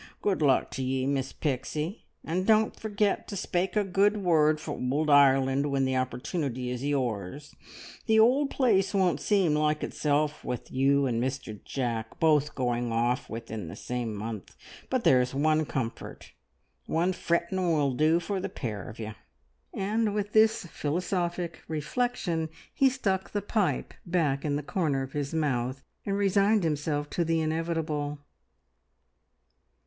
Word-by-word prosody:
Good 195 -5 +1
luck 140 -3 +3
to 135 - -4
ye, 130 0 0
Miss 135 -1 -1
Pixie, 150 - -3 0.2
and 180 +4 -2
don't 220 -1 +4
forget 210 -2 -1
to 205 - -6
spake 185 0 -1
a 210 - +3
good 200 +2 +2
word 155 -5 +3
for 155 - -5
Ould 145 +4 0
Ireland 135 0 +5
when 135 -1 +1
the 130 0 0
opportunity 130 0 -2
is 125 +1 -4
yours. 135 -1 -2 0.5
The 220 -1 +5
ould 265 +6 +4
place 205 -9 +2
won't 185 -3 +2
seem 195 -7 +2
like 150 0 +1
itself 150 0 0
with 125 - -5
you 140 +1 +3
and 120 -3 0
Mr 125 -5 -4
Jack 115 -4 -3
both 150 -2 +3
going 120 -2 -1
off 120 +2 0
within 110 -4 -6
the 80 - -7
same 120 -3 -4
month; 110 -1 -6 0.3
but 255 -2 0
there's 125 -4 +3
one 155 +2 +2
comfort 115 -4 -5 0.6
one 175 +3 +1
frettin' 175 +1 0
will 145 -4 +2
do 155 +5 +3
for 190 +3 -3
the - - -3
pair 105 -7 -5
of 110 - -10
you!" 110 -1 -5 0.6
And 210 +1 0
with 205 0 -2
this 220 -1 +4
philosophic 175 +2 -2
reflection 165 - -1 0.2
he 270 - +4
stuck 195 -8 -1
the 205 - 0
pipe 205 -2 0
back 155 -6 +1
in 145 -2 0
the 145 - -2
corner 145 -5 0
of 135 - -8
his 145 -1 -2
mouth 135 -4 -1 0.2
and 200 0 0
resigned 200 +1 +3
himself 150 -1 -1
to 175 - 0
the 165 0 +1
inevitable. 155 -2 -1
150 Hz, 155 wpm, -28 LUFS, 130-185 Hz, 0.6 s, Ireland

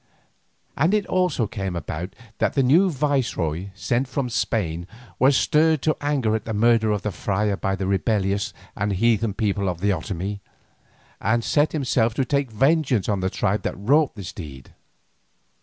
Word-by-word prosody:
And 165 +8 +2
it 210 - +1 0.5
came 95 -5 -3
about 85 - -4
also, 100 - -31 0.2
that - - +1
the 135 - +2
new 165 +10 +5
viceroy 125 - -1
sent 120 +4 -1
from 130 -1 -3
Spain 85 -7 -1 0.3
was 130 +1 +5
stirred 155 -2 +3
to 155 - +2
anger 140 -7 +1
at 110 - -4
the 110 - -3
murder 115 0 +3
of 105 -2 -1
the 105 - -1
friar 100 +3 -1
by 95 0 -1
the 95 0 -3
rebellious 100 +1 0 0.2
and 105 0 -1
heathen 110 +1 +1
people 100 -3 0
of 85 -2 -4
the 100 +2 +1
Otomie, 95 +1 -4 0.8
and 115 +3 +1
set 150 +5 +2
himself 120 -6 +1
to 135 - +1
take 140 -1 0
vengeance 135 - +2
on 100 -2 0
the 95 0 0
tribe 105 +2 0
that - - -3
wrought 140 +9 +2
the 100 - -7
deed. 70 -8 -10
110 Hz, 170 wpm, -23 LUFS, 100-135 Hz, 0.8 s, new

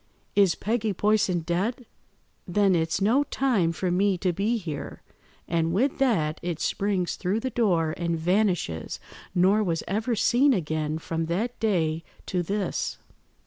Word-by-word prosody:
is 195 -4 +4
Peggy 220 0 -1
Poyson 200 -3 +2
dead? 200 +9 -1 0.6
Then 195 +1 +3
it's 160 -1 +1
no 235 +8 +4
time 235 -13 +1
for 180 +2 -2
me 190 +1 +2
to 180 0 0
be 210 +7 0
here;' 155 -8 -6 0.4
and 165 -1 0
with 260 +9 +1
that 190 - +1
it 175 -2 -3
springs 195 -3 -1
through 195 +4 0
the 260 +3 -3
door 175 -10 +1
and 170 -1 -1
vanishes, 175 - 0 0.4
nor 195 +4 +4
was 165 -4 -1
ever 220 +4 0
seen 260 +6 +4
again 155 -3 -2
from 165 0 -3
that 215 +9 -2
day 165 -7 0 0.2
to 180 - -1
this." 200 +4 -2
185 Hz, 145 wpm, -26 LUFS, 165-215 Hz, 0.6 s, is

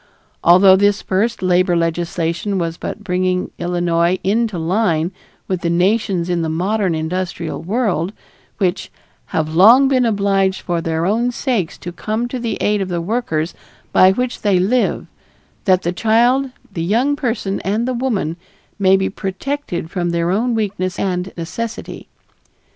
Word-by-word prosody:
Although 185 +2 +7
this 205 0 +2
first 205 +3 0
labor 180 0 +3
legislation 170 +3 -1
was 165 -2 -2
but 210 - -6
bringing 185 -1 -1
Illinois 175 0 +1
into 215 0 0
line 170 -1 0 0.4
with 185 -2 -2
the 170 - 0
nations 185 0 +1
in 175 -1 0
the 160 - -1
modern 185 +2 0
industrial 170 +1 -3
world, 190 -3 -1 0.5
which 185 -2 -1 0.4
"have 155 -1 -2
long 230 +11 +7
been 260 -2 +2
obliged 200 -3 +1
for 170 -2 -2
their 165 0 -1
own 230 +6 +1
sakes 235 - -2
to 175 - -7
come 220 +6 -3
to 255 - -4
the 235 -1 -2
aid 210 -1 +1
of 190 - -3
the 175 -1 -1
workers 170 -4 -2 0.4
by 185 0 +6
which 250 +5 -2
they 200 -3 +3
live 215 +8 +1 0.6
that 185 -2 +3
the 175 - -1
child, 240 +7 +2 0.2
the 165 - -3
young 235 +11 +1
person 230 -8 -2
and 215 +5 -1
the 255 - 0
woman 225 -10 -1 0.4
may 190 -1 +5
be 190 - 0
protected 190 - -4
from 175 -2 -1
their 170 0 0
own 230 +5 +1
weakness 195 -4 -2
and 185 -1 -2
necessity?" 225 +7 -6
190 Hz, 155 wpm, -18 LUFS, 175-220 Hz, 0.6 s, Although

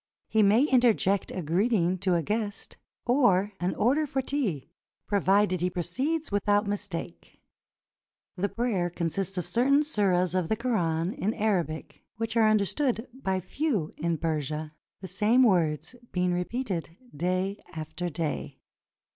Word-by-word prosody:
He 220 - +2
may 210 +5 +5
interject 240 -8 +3
a 185 - -4
greeting 185 +2 +1
to 185 -1 +1
a 170 - +1
guest 210 0 -3 0.3
or 210 -6 +3
an 180 +1 -1
order 280 +8 +2
for 270 - -2
tea, 250 - -2 0.4
pro 205 - +1
vided 195 -1 +3
he 180 +2 +1
proceeds 260 - -2
without 205 +1 +2
mistake. 195 - -5 1.0
The 200 +3 -1
prayer 215 -7 0
con 170 -1 -2
sists 195 +3 -3
of 180 - -1
certain 275 +5 +3
suras 185 - +1
of 180 -3 0
the 220 - +2
Koran 180 -8 0
in 215 +4 -2
Arabic, 185 -8 -1
which 225 +1 -3
are 220 -2 +5
understood 225 +4 +1
by 190 -8 -2
few 210 - -2
in 170 +1 -1
Persia, 155 -1 -2 0.3
the 190 - -6
same 225 +6 +3
words 165 - +2 0.2
being 180 0 +1
repeated 180 -3 -3 0.2
day 185 +5 -1
after 160 +2 -5
day. 160 -1 -4
195 Hz, 145 wpm, -28 LUFS, 175-225 Hz, 1.0 s, may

